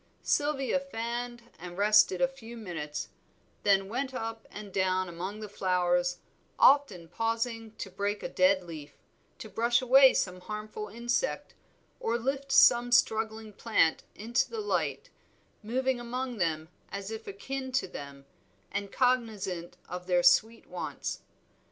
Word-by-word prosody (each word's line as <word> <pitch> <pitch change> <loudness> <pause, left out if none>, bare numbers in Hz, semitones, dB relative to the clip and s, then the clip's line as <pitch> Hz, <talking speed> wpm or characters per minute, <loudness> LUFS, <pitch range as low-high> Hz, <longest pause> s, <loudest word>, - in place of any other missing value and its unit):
Sylvia 285 -2 +1
fanned 240 -2 -5 0.2
and 175 +1 -8
rested 210 -2 +5
a 265 - +5
few 240 -3 -11
minutes, 160 -8 -5 0.5
then 195 -1 +3
went 260 +4 -3
up 225 -2 -5
and 205 -2 -9
down 185 -1 +1
among 185 +5 -6
the 215 - -5
flowers, 180 -2 +1 0.4
often 265 -12 +4
pausing 225 +3 -2
to 195 - -7
break 200 +2 -2
a - - -1
dead 185 0 +3
leaf, 155 -4 -10 0.4
to - - -8
brush 235 +3 +2
away 265 +1 +7
some 185 -1 -1
harmful 210 +1 -6
insect, 240 - -2 0.5
or 230 +1 0
lift 270 +3 -3
some 245 -2 +6
struggling 220 -3 +2
plant 200 -7 +2
into 230 +4 0
the 455 - -5
light; 430 +3 -2 0.5
moving 255 +3 0
among 250 +1 -4
them 160 -2 -1 0.2
as 200 +1 -5
if 220 0 -7
akin 260 +7 -5
to 255 - +1
them, 140 -4 -9 0.5
and 200 0 -3
cognizant 220 -9 0
of 180 0 -7
their 180 -1 +3
sweet 220 +6 +4
wants. - - -5
220 Hz, 140 wpm, -29 LUFS, 185-245 Hz, 0.5 s, away